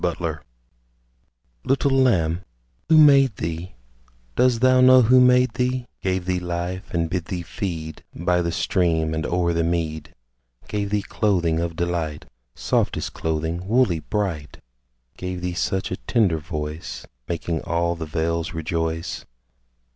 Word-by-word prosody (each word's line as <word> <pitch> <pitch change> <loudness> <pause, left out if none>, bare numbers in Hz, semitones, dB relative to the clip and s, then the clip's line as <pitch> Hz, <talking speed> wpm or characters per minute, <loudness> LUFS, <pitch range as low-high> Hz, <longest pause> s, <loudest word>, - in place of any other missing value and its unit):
THE 85 - +1
LAMB 80 -3 -3 1.2
Little 135 +1 +1
Lamb, 95 -11 +2 0.5
who 160 - +6
made 140 -6 +6
thee 85 +2 -5 0.6
Dost 125 -2 +3
thou 130 0 +5
know 130 0 +7
who 125 +3 +6
made 125 0 +4
thee, 125 0 -1 0.2
Gave 95 -1 -1
thee 90 0 0
life, 90 +2 -4
and 85 -1 0
bid 90 0 -3
thee 90 -1 -4
feed 85 -4 -5
By 90 +1 +1
the 85 0 -1
stream 80 -2 +1
and 80 -1 -2
o'er 85 -1 +1
the 85 0 +1
mead; 80 -2 -2 0.5
Gave 100 -1 -2
thee 105 0 0
clothing 85 -6 +1
of 85 -1 -3
delight, 85 -3 -2 0.3
Softest - - -1
clothing, 80 +3 -2
woolly, 110 -7 +3
bright; 85 -5 -3 0.6
Gave 90 -1 -5
thee 90 0 -2
such 95 +3 -1
a - - -2
tender 100 -10 +1
voice, 75 -5 -6 0.2
Making 85 -1 -2
all 85 +1 0
the 80 -1 -6
vales 85 +1 -2
rejoice? 80 0 -3
85 Hz, 140 wpm, -23 LUFS, 80-105 Hz, 1.2 s, know